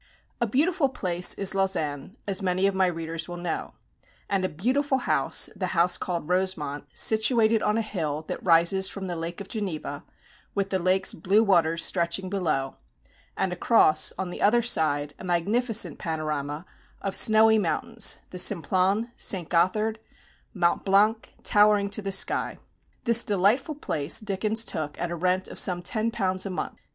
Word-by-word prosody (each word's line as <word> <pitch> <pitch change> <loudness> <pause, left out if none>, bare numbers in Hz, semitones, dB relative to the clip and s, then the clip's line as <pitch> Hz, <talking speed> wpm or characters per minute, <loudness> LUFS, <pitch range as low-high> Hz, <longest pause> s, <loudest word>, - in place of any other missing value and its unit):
A 235 - +1
beautiful 295 - +1
place 180 -8 +3
is 195 -1 +3
Lausanne, 185 - -2
as 200 0 -1
many 185 0 0
of 195 - +1
my 190 -1 +2
readers 165 -1 -4
will 175 -1 -7
know; 175 -1 -5 0.5
and 195 -2 -1
a 185 - 0
beautiful 260 - -1
house 255 - +2
the 190 -2 -3
house 175 +1 +3
called 170 -5 -3
Rosemont, 180 -6 -2
situated 220 0 +3
on 210 +1 0
a 225 - 0
hill 155 -8 -4
that - - -6
rises 180 +2 +3
from 195 -1 -7
the 180 -2 -4
Lake 165 +2 -6
of 200 - -8
Geneva, 165 - -5 0.5
with 195 -1 -2
the 190 - 0
lake's 185 +2 +2
blue 195 +6 +2
waters 170 -5 +2
stretching 180 +1 -1
below, 155 -9 -2 0.6
and 190 -2 -1
across, 170 -5 +3
on 185 -2 -4
the - - -8
other 235 +3 +3
side, 145 -9 +1
a - - -10
magnificent 200 - +1
panorama 155 -1 -4 0.3
of 195 - -3
snowy 220 0 +5
mountains, - - 0
the 180 - -6
Simplon, 190 +5 +1
St. 180 -5 -1
Gothard, 215 +6 0 0.5
Mont 175 -4 0
Blanc, 210 +3 +2
towering 205 -1 +3
to 210 - -1
the 195 -1 -4
sky. 195 - +1 0.5
This 235 -1 +5
delightful 210 - +1
place 155 - +1
Dickens 215 +2 0
took 150 -7 -4
at 175 - -3
a - - -3
rent 185 +2 0
of - - -7
some 175 -1 +2
£10 205 -3 -2
a 195 - -4
month. 185 - -5
190 Hz, 165 wpm, -25 LUFS, 170-215 Hz, 0.6 s, snowy